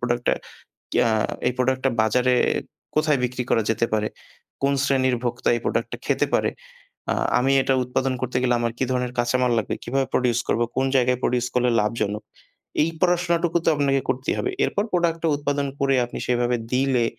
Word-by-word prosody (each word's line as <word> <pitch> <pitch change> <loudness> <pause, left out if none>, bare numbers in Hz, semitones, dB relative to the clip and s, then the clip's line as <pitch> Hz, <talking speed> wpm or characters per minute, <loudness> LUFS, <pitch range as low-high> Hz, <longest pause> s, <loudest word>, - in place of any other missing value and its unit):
Product 120 0 -1 0.7
কিয়া 120 - +3 0.4
এই - - +3
প্রোডাক্টটা 130 +1 +1
বাজারে 125 +3 +2 0.6
কোথায় 155 -2 +2
বিক্রি 125 0 -1
করা 115 - +3
যেতে 115 +1 +2
পারে, 105 0 +1 0.5
কোন 140 +1 +2
শ্রেণীর 130 -2 +2
ভোক্তা 120 0 -1
এই 120 - -3
প্রোডাক্টটা - - -1
খেতে - - +2
পারে। - - +2 0.6
আ - - -1 0.2
আমি 135 +2 +2
এটা 135 - +1
উৎপাদন 130 +1 -1
করতে 125 0 -2
গেলে 125 -1 +2
আমার 115 -1 0
কি - - +1
ধরণের 125 -1 -1
কাঁচামাল 125 +1 +2
লাগবে, 110 - -2
কিভাবে 135 0 0
produce 120 -2 +2
করব, 115 - +1 0.2
কোন 135 - +2
জায়গায় 125 -1 +2
produce 125 0 +1
করলে 125 0 +2
লাভজনক। 105 -1 -1 0.6
এই 160 - +2
পড়াশোনাটুকু 175 -1 +2
তো - - +5
আপনাকে 140 -1 +2
করতেই 130 0 0
হবে। 385 - -1
এরপর 205 - 0
প্রোডাক্টটা 165 -2 +1
উৎপাদন 145 -1 -1
করে 135 -1 +2
আপনি 120 - -7
সেভাবে 120 0 +1 0.2
দিলে 130 -2 +2
125 Hz, 170 wpm, -23 LUFS, 120-140 Hz, 0.7 s, তো